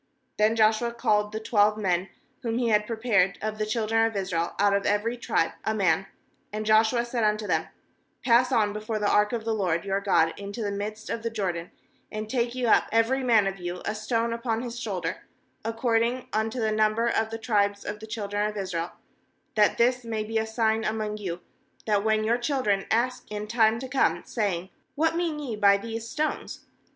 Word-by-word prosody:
4Then 215 +1 +4
Joshua 220 +1 +3
called 210 -2 +1
the 215 - -3
twelve 210 -1 +3
men, 185 -3 0 0.3
whom 230 -2 -2
he 240 -1 +1
had 210 -1 +2
prepared 220 -5 +1
of 215 0 -4
the 215 - -1
children 225 0 +1
of 225 -1 0
Israel, 175 -4 -2
out 205 0 +3
of 200 0 +1
every 210 +4 +1
tribe 240 - 0
a 220 - 0
man; 195 -2 +2 0.4
^nd 215 +1 -3
Joshua 220 +2 +3
said 235 -1 -2
unto 215 0 +1
them: 160 -4 0 0.6
'Pass 250 +1 +4
on 215 -4 +2
before 215 +1 -3
the 210 -1 0
ark 210 0 +3
of 230 -2 -3
the 225 - 0
LORD 180 -4 0
your 195 0 0
God 165 -5 +3
into 200 +3 -5
the 205 - -1
midst 210 +2 -5
of 230 - -3
the 230 - -2
Jor 205 -5 -1
dan, 170 0 -7 0.4
and 215 0 -4
take 240 0 -1
you 250 -2 -1
up - - +4
every 230 +4 +2
man 225 -5 +4
of 195 -1 -3
you 175 0 -5
a 215 - -1
stone 230 +2 -1
upon 230 0 -2
his 240 -1 -5
shoulder, 185 -7 -4 0.4
ac 225 +1 -3
cording 235 +1 +1
unto 220 +3 -1
the 220 -1 +1
number 215 +1 +2
of 220 -1 +1
the 225 - -4
tribes 205 -3 0
of 210 0 -4
the 220 - -9
children 205 -1 -2
of 210 - -7
Israel; 180 -3 -3 0.6
^hat 210 -1 +4
this 250 +1 +2
may 220 -2 -2
be 220 +1 -1
a 220 - -2
sign 220 0 +1
among 215 -1 -2
you, 180 -4 -5 0.4
that 205 -2 +2
when 215 0 +2
your 235 +3 +1
children 240 -7 0
ask 245 +3 0
in 210 0 -4
time 225 0 +3
to 260 +3 -6
come, 265 +1 +1
saying: 190 -5 -2 0.2
What 325 +2 +1
mean 335 -3 -1
ye 270 -7 -4
by 200 -1 +5
these 225 +2 -6
stones? 305 +1 -3
215 Hz, 205 wpm, -26 LUFS, 205-230 Hz, 0.6 s, by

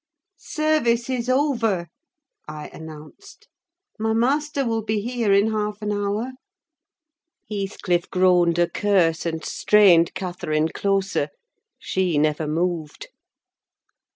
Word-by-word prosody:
"Service 265 -6 0
is 250 -1 -2
over," 235 - +1 0.6
I 155 0 -7
announced. 160 - -12 0.5
"My 220 0 0
master 280 +4 0
will 225 -1 -1
be 215 0 -1
here 235 -1 -1
in 200 +3 +4
half 210 -1 -2
an 210 - -1
hour." 205 +4 -2 1.2
Heathcliff 195 -3 -2
groaned 180 -2 +3
a 175 0 +3
curse, 175 -4 +1
and 160 -1 -4
strained 185 -6 +4
Catherine 175 -4 -2
closer: 195 -5 -1 0.5
she 185 -4 -1
never 155 +1 +1
moved. 165 - -3
200 Hz, 105 wpm, -23 LUFS, 170-230 Hz, 1.2 s, in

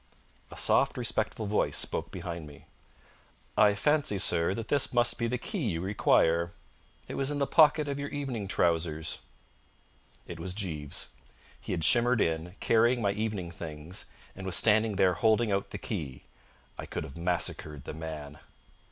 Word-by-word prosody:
A - - -11
soft, - - +3
respectful 110 - -2
voice 105 +1 +1
spoke - - 0
behind 85 -3 -6
me. 75 -2 -14 0.9
"I 105 -1 +5
fancy, 145 -1 +1
sir, 85 0 +2
that 115 -1 -5
this 145 -2 +1
must 120 -1 +2
be 115 - 0
the 125 +2 -1
key 205 - -4
you 85 -3 -2
require. 85 -3 +2 0.5
It - - -6
was 135 0 0
in 145 - -1
the 140 - +1
pocket 150 0 +5
of 140 0 -3
your 140 0 -4
evening 130 -8 -4
trousers." 80 -3 0 1.1
It 85 - -8
was 90 +2 -5
Jeeves. 80 -8 -3 0.5
He - - -7
had 85 -3 -1
shimmered 120 +6 +5
in, 80 +2 -1
carrying 120 +2 +3
my 100 -3 +1
evening 100 -4 -3
things, 80 +1 -5 0.3
and 95 - -8
was 90 - +1
standing 110 -1 +4
there 95 -1 +4
holding 110 +4 +2
out 100 0 -1
the - - -6
key. 75 - -5 0.6
I - - -6
could - - -4
have 70 -3 -10
massacred 85 -4 -2
the - - -7
man. 75 -2 -7
95 Hz, 165 wpm, -29 LUFS, 80-115 Hz, 1.1 s, I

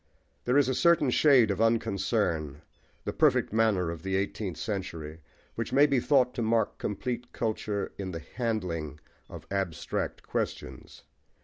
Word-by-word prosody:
There 125 +3 +3
is 145 -3 +4
a 130 - +1
certain 165 -2 +3
shade 125 -7 +5
of 100 - -2
unconcern, 95 -9 0 0.4
the - - -2
perfect - - +2
manner 105 -6 +2
of 85 -1 -7
the 95 +1 -2
eighteenth 95 -2 -2
century, 85 -7 -5 0.3
which - - -4
may 145 +2 +6
be 140 -3 +2
thought 125 0 +3
to - - -3
mark 115 0 +1
complete 120 +4 -4
culture 105 -3 -2
in 95 -1 -3
the 80 -3 -6
handling 90 - -2 0.3
of - - -10
abstract 95 -5 -3
questions. - - -5
105 Hz, 145 wpm, -28 LUFS, 90-120 Hz, 0.4 s, may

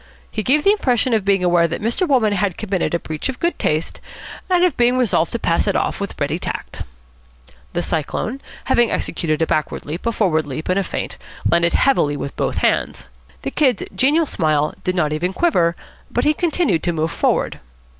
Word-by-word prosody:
He 215 - -2
gave 290 +7 +3
the 395 - +5
impression 255 - +1
of 220 -3 +2
being 195 -1 +2
aware 175 -1 +4
that 170 - -4
Mr. 235 - 0
Wolmann 240 -8 +3
had 200 -3 0
committed 190 -5 -1
a - - 0
breach 155 +9 -4
of 260 - -5
good 340 +1 -1
taste 155 +2 -1 0.5
and 360 -1 +3
of 360 - +3
being 245 +1 +3
resolved 215 -9 +1
to - - 0
pass 170 -3 +1
it 200 - +1
off - - -1
with 200 -1 -5
ready 145 +4 -1
tact. - - -6 0.9
The 175 - -1
Cyclone, 175 - -2 0.2
having 240 -3 +3
executed 155 -1 -1
a - - +3
backward 155 -1 -2
leap, 165 +9 -5
a - - +2
forward 165 -9 +1
leap, 145 +5 -5
and 185 +2 +2
a - - 0
feint, - - -5 0.3
landed 170 0 +3
heavily 150 - +2
with 140 - -5
both - - -2
hands. - - 0 0.4
The 135 - -3
Kid's 260 -8 +2
genial 290 - +3
smile 155 - 0
did 185 - -1
not 155 -4 +1
even 175 +5 -1
quiver, 175 - +2 0.3
but - - 0
he 300 - +3
continued 320 - +1
to 175 - -1
move 160 0 -1
forward. - - 0
190 Hz, 200 wpm, -20 LUFS, 165-255 Hz, 0.9 s, the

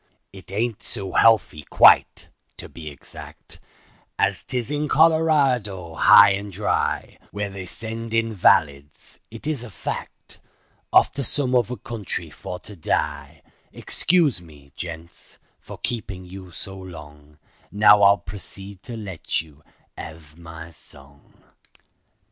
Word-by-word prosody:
It 95 -1 -11
ain't 110 +2 -2
so 100 -5 -5
healthy 110 -9 +3
quite—to - - +3
be 80 -2 -9
exact— 70 - -11 0.6
As 100 0 +1
'tis 125 +1 -4
in 150 0 -1
Colorado 140 - +2
high 100 +5 +7
and 100 +1 -3
dry, 100 +3 -2
Where 105 -1 -4
they 95 -1 -8
send 115 +3 -5
invalids—it 110 - 0
is 150 -5 -2
a 120 - -9
fact— 95 - -7 0.5
Off - - +5
to 140 - -4
some 130 0 +1
other 125 0 +1
country 115 -5 -5
for 90 - -7
to 105 - -7
die; 75 -2 -3 0.3
Excuse 160 - +1
me, 75 -4 -17
gents, 85 -1 -9 0.2
for - - -11
keepin' 100 -6 -5
you 95 0 -10
so 95 +3 -8
long, 75 -5 -12 0.3
Now 105 0 +6
I'll 100 0 +6
proceed 100 0 -8
to 120 -2 -8
let 95 -7 -3
you 75 -2 -20 0.4
hev 80 -1 -10
my 80 0 -11
song." 70 -2 -18
100 Hz, 125 wpm, -23 LUFS, 80-115 Hz, 0.6 s, high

